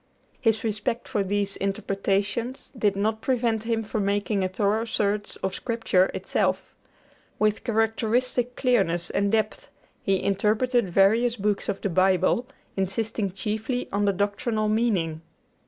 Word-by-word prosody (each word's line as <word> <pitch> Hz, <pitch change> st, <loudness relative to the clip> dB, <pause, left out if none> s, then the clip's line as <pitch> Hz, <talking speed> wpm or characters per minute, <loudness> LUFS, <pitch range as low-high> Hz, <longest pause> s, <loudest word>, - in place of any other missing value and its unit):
His 225 Hz, -3 st, +2 dB
respect 220 Hz, +2 st, -2 dB
for 205 Hz, -, 0 dB
these 200 Hz, 0 st, -1 dB
interpretations 200 Hz, +5 st, -2 dB
did 210 Hz, -5 st, +1 dB
not 215 Hz, +2 st, 0 dB
prevent 230 Hz, -4 st, 0 dB
him 225 Hz, -1 st, 0 dB
from 215 Hz, 0 st, -2 dB
making 200 Hz, 0 st, 0 dB
a -, -, +2 dB
thorough 205 Hz, +4 st, 0 dB
search 210 Hz, -2 st, -1 dB
of 190 Hz, -, -1 dB
Scripture 225 Hz, -6 st, +1 dB
itself. -, -, -1 dB, 0.6 s
With 215 Hz, 0 st, +1 dB
characteristic 235 Hz, +2 st, 0 dB
clearness 190 Hz, -10 st, +1 dB
and 200 Hz, 0 st, +1 dB
depth 215 Hz, -2 st, -1 dB, 0.3 s
he 195 Hz, -1 st, 0 dB
interpreted 215 Hz, +3 st, +1 dB
various 220 Hz, +6 st, +4 dB
books 205 Hz, -2 st, -1 dB
of 200 Hz, -, -2 dB
the 200 Hz, -, -1 dB
Bible, 185 Hz, +6 st, +3 dB, 0.3 s
insisting 200 Hz, +1 st, -1 dB
chiefly 220 Hz, +6 st, -3 dB
on 205 Hz, +1 st, +1 dB
the 200 Hz, -, +3 dB
doctrinal 210 Hz, +2 st, 0 dB
meaning. 195 Hz, -8 st, 0 dB
210 Hz, 135 wpm, -25 LUFS, 195-230 Hz, 0.6 s, various